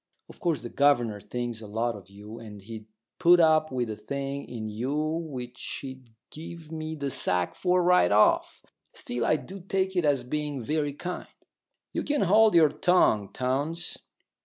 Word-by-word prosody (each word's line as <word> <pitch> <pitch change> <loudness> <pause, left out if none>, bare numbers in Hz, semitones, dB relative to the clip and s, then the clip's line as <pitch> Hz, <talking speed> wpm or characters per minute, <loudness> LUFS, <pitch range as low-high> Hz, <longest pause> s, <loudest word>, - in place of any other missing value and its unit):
Of - - -14
course 170 -3 0
the 120 - -5
governor 120 -8 +2
thinks 120 -1 -4
a 110 - -8
lot 115 +2 -1
of 95 -2 -12
you, 105 +3 -10
and 105 -3 -10
he'd 110 0 -9 0.3
put 175 0 +6
up 155 -2 +4
with 125 -2 -1
a 110 - -4
thing 140 +6 -4
in 115 -3 -6
you 120 +7 -3
which 155 -5 -3
he'd 130 -2 -9 0.2
give 160 0 -9
me 160 0 -4
the 140 -2 -3
sack 90 -6 +1
for 180 -1 +1
right 175 - +4
off. 105 +1 +3 0.3
Still, 120 -1 -4
I 155 - +3
do 190 +5 -7
take 190 +1 -1
it 180 - +2
as 140 -4 +2
being 145 +2 -3
very 145 +4 -1
kind 180 +5 -5 0.4
" - - -53
"You - - -1
can 295 -1 0
hold 215 +2 +5
your 160 -3 +7
tongue, 125 - +3
Townes. 145 +7 -1
140 Hz, 180 wpm, -27 LUFS, 115-165 Hz, 0.4 s, your